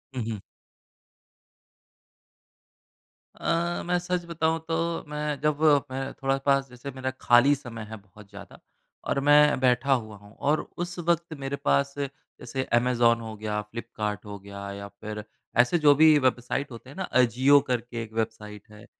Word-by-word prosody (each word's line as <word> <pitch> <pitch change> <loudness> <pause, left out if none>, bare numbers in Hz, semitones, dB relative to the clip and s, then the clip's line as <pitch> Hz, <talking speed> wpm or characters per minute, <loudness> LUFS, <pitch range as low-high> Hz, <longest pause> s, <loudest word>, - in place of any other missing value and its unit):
हुँ, 125 - -2
हुँ। 110 - -4 3.0
अ, 170 +1 -1
मैं 180 0 +1
सच 180 0 -2
बताऊँ 165 -1 0
तो 165 0 -1
मैं 150 -1 -3
जब 150 -1 +1 0.3
मैं 135 +1 -4
थोड़ा 135 0 -1
पास 135 -1 +2
जैसे 125 +3 -8
मेरा 130 0 -4
खाली 120 +4 +6
समय 120 -5 -8
है 110 - -7
बहुत 100 0 -17
ज़्यादा 100 0 -12 0.5
और - - +1
मैं 150 -1 +6
बैठा 130 +2 +3
हुआ 110 -5 -3
हूँ 105 +1 -17
और 145 +2 +1 0.2
उस 175 +1 -4
वक़्त 170 -1 0
मेरे 135 0 -3
पास 140 0 +2
जैसे 135 -1 -5 0.2
अमेज़न 120 -1 +3
हो 110 -1 -7
गया 105 0 -2
फ्लिपकार्ट 105 -1 -5
हो 100 -1 -7
गया 100 0 -8
या 100 0 -7
फ़िर 105 +1 -8 0.3
ऐसे 125 +8 +4
जो 150 -2 +6
भी 155 +1 +7
वेबसाइट 130 +1 0
होते 120 +2 -11
हैं 140 - -12
ना 190 - -2 0.2
अजियो 130 +4 +5
करके 120 -1 -2
एक 110 -1 -12
वेबसाइट 110 -2 -4
है 105 0 -14
130 Hz, 160 wpm, -26 LUFS, 110-150 Hz, 3.0 s, भी